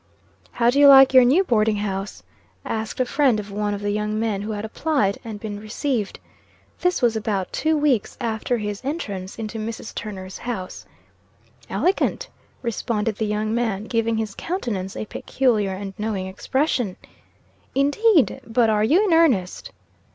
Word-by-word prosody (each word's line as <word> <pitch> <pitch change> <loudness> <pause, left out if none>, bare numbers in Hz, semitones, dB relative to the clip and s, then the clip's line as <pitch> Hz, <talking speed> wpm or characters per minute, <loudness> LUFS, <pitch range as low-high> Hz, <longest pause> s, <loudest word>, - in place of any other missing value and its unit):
"How 235 0 +3
do 280 - +1
you 285 - +8
like 270 -1 +8
your 255 -1 +8
new 280 +10 +4
boarding 220 - +2
house?" 195 - -4 0.4
asked 220 +2 -4
a 255 - +3
friend 260 -4 +2
of 205 -1 -7
one 205 0 -1
of 200 - -7
the 205 0 -1
young 210 +1 -1
men 220 -3 -1
who 215 +1 -4
had 205 +1 -4
applied, 220 -4 0
and 220 -3 -7
been 205 -1 -6
received. 215 0 -3 0.6
This 360 -6 0
was 235 -2 +3
about 210 -4 -2
two 315 0 +1
weeks 280 -8 +1
after 230 0 -1
his 210 -2 -4
entrance 205 - -4
into 225 0 -5
Mrs. 225 0 -6
Turner's 190 -3 -7
house. 220 -7 -6 0.8
"Elegant," 375 +3 0 0.3
responded 225 -2 -2
the 220 - -1
young 210 +1 -1
man, 225 -4 -1
giving 230 0 0
his 220 -2 -3
countenance 215 - -4
a - - -4
peculiar 220 -3 0
and 195 0 -6
knowing 210 -3 -2
expression. 245 +1 -1 0.8
"Indeed? 290 - +3
But 230 -1 +2
are 210 0 +2
you 325 - +4
in 350 - +2
earnest?" 255 - +2
220 Hz, 160 wpm, -23 LUFS, 205-260 Hz, 0.8 s, you